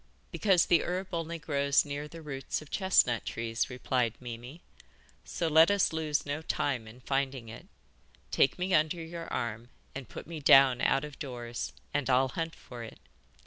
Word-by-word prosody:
'Because 190 -5 +3
the 170 - +4
herb 185 +2 -3
only 165 0 -3
grows 140 -2 +2
near 145 +1 -5
the 165 +2 -11
roots 135 -3 -4
of 155 - -14
chestnut 185 - +3
trees,' 115 0 -2
replied 125 -2 -1
Mimi; 125 +6 -9 0.6
'so 170 - -2
let 160 +1 +6
us 200 -4 +2
lose 155 -2 -1
no 145 +2 -3
time 130 -7 -1
in 120 +3 -13
finding 135 -3 -2
it. 115 - -11 0.6
Take 135 - +3
me 185 +1 -1
under 155 +2 +3
your 165 0 -7
arm 115 0 -3 0.2
and 135 -2 -7
put - - -8
me 165 -2 -7
down 135 -3 +6
out 135 +2 +2
of 150 -2 -11
doors, 120 -4 -5 0.2
and 145 -2 -1
I'll 130 +1 +4
hunt 165 +4 -4
for 120 -1 -10
it. 115 - -10
140 Hz, 175 wpm, -30 LUFS, 125-165 Hz, 0.6 s, let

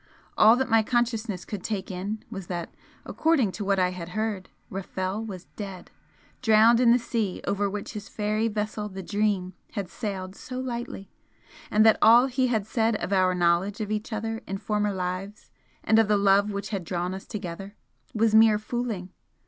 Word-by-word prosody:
All 220 +2 +7
that 265 +1 0
my 225 -2 +4
consciousness 225 -5 -1
could 200 -4 -6
take 205 -3 -3
in 200 +4 -4
was 195 -5 -6
that, 175 -2 -5 0.3
according 305 - +2
to 205 - -5
what 195 0 +1
I 180 -1 +3
had 175 -2 -7
heard, 215 -4 -2 0.2
Rafel 190 +2 -3
was 190 -5 -7
dead, 195 -3 -8 0.5
drowned 225 0 +5
in 245 -2 +5
the 240 - +6
sea 225 -5 -2
over 200 0 0
which 205 +2 -5
his 210 -1 -7
fairy 215 +1 0
vessel 210 -1 -3
the 190 -1 -7
'Dream' 200 -2 0 0.2
had 200 -5 -4
sailed 190 -2 -5
so 255 +2 -7
lightly 240 -6 -5 0.6
and 215 +1 +4
that 220 - +6
all 235 +3 +7
he 260 0 +1
had 220 -5 0
said 225 0 +1
of 200 - -3
our 185 -1 +3
knowledge 175 +4 +1
of 215 -1 -3
each 215 +2 -3
other 225 +1 -3
in 195 - -3
former 210 0 -1
lives, 185 +2 -5 0.3
and 220 - +4
of 225 - +4
the 210 0 +3
love 200 +1 +4
which 200 0 -4
had 195 -4 -3
drawn 175 +1 -2
us 190 - -8
together, 195 0 -6 0.4
was 220 0 +2
mere 220 -1 +6
'fooling'! 215 -4 -4
210 Hz, 185 wpm, -26 LUFS, 190-225 Hz, 0.6 s, All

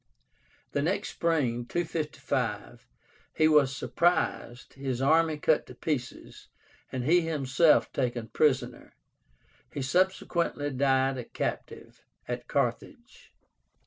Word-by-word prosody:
The - - 0
next - - -1
spring 125 -8 -1
(255) 130 -9 -3 0.5
he 155 - +4
was 140 -4 +3
surprised, 160 -8 -1
his 135 -3 -4
army 160 +3 +3
cut 150 +1 +1
to 125 - -11
pieces, 130 -3 -5 0.4
and 130 -1 -3
he 170 +7 +4
himself 155 -1 +2
taken 120 -4 -2
prisoner. 125 -2 0 0.8
He 140 - -4
subsequently 170 -2 0
died 135 0 +1
a - - -4
captive - - -6 0.2
at - - -5
Carthage. - - -3
135 Hz, 105 wpm, -28 LUFS, 125-160 Hz, 0.8 s, he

